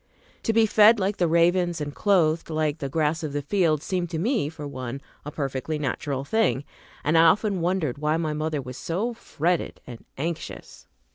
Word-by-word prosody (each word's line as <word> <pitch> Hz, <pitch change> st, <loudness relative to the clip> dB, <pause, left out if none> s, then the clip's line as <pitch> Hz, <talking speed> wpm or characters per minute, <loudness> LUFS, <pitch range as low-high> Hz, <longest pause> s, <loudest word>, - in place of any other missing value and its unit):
To -, -, +1 dB
be 225 Hz, 0 st, +4 dB
fed 215 Hz, +1 st, +6 dB
like 195 Hz, +1 st, 0 dB
the 175 Hz, -, +2 dB
ravens 170 Hz, +1 st, +2 dB
and 145 Hz, -1 st, -4 dB
clothed 165 Hz, -5 st, +2 dB
like 155 Hz, -1 st, -1 dB
the 140 Hz, -, -3 dB
grass 155 Hz, +3 st, 0 dB
of 155 Hz, -3 st, -4 dB
the 145 Hz, 0 st, -2 dB
field 160 Hz, -2 st, +1 dB
seemed 180 Hz, -2 st, -2 dB
to 165 Hz, -, -3 dB
me, 215 Hz, -, 0 dB
for 150 Hz, -2 st, -7 dB
one, 130 Hz, -1 st, -5 dB, 0.2 s
a 150 Hz, -, -5 dB
perfectly 140 Hz, +1 st, -3 dB
natural 140 Hz, -1 st, -3 dB
thing, 145 Hz, -, +1 dB, 0.4 s
and 155 Hz, +3 st, +1 dB
I 165 Hz, 0 st, +7 dB
often 195 Hz, +2 st, +3 dB
wondered 165 Hz, -7 st, -1 dB
why 150 Hz, +1 st, +1 dB
my 160 Hz, -2 st, -1 dB
mother 155 Hz, -2 st, -2 dB
was 125 Hz, 0 st, -8 dB
so 205 Hz, +9 st, -2 dB
fretted 175 Hz, -5 st, -2 dB
and 120 Hz, -2 st, -10 dB
anxious. 165 Hz, +4 st, -6 dB
160 Hz, 190 wpm, -25 LUFS, 145-180 Hz, 0.4 s, I